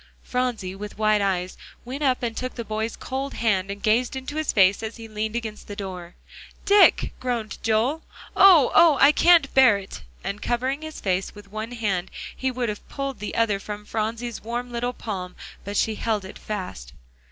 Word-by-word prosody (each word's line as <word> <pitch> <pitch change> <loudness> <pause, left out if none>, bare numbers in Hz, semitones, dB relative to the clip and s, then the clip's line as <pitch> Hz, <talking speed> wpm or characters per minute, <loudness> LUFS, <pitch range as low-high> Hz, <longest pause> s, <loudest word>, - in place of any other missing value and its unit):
Phronsie, 245 -7 -2
with 205 +2 -8
wide 215 -1 +3
eyes, 185 -2 -1 0.3
went 260 +4 -6
up 260 -3 +1
and 230 -2 -2
took 255 +1 -4
the 235 - -4
boy's 220 +1 -3
cold 270 +1 -4
hand, 195 -4 +1
and 200 0 -6
gazed 235 +4 +2
into 265 +2 -6
his 310 - 0
face 195 0 +4
as 220 0 -5
he 225 -1 -9
leaned 215 +1 -3
against 220 -3 -5
the 205 - -7
door. 180 -3 -7 0.5
"Dick!" 405 0 +5
groaned 240 -4 -3
Joel; 230 +8 +1 0.3
"oh! 360 -9 +7
oh! 330 -4 +6
I 280 - +8
can't 335 -2 +5
bear 255 -6 +6
it," 195 -1 -9 0.2
and 200 +2 -4
covering 260 +4 -1
his 315 0 -7
face 190 +1 -1
with 205 -1 -14
one 215 +3 -5
hand, 200 -6 -1 0.3
he 265 - -1
would 250 -1 -2
have 210 - -7
pulled 275 -1 -4
the 210 - -5
other 220 -3 +2
from 210 +1 -7
Phronsie's 225 +2 -3
warm 240 +2 -4
little 240 +1 -2
palm, 185 -7 -6 0.3
but 200 +1 -4
she 220 - +2
held 215 -2 -2
it 190 - -10
fast. 180 - -6
225 Hz, 190 wpm, -24 LUFS, 205-255 Hz, 0.5 s, I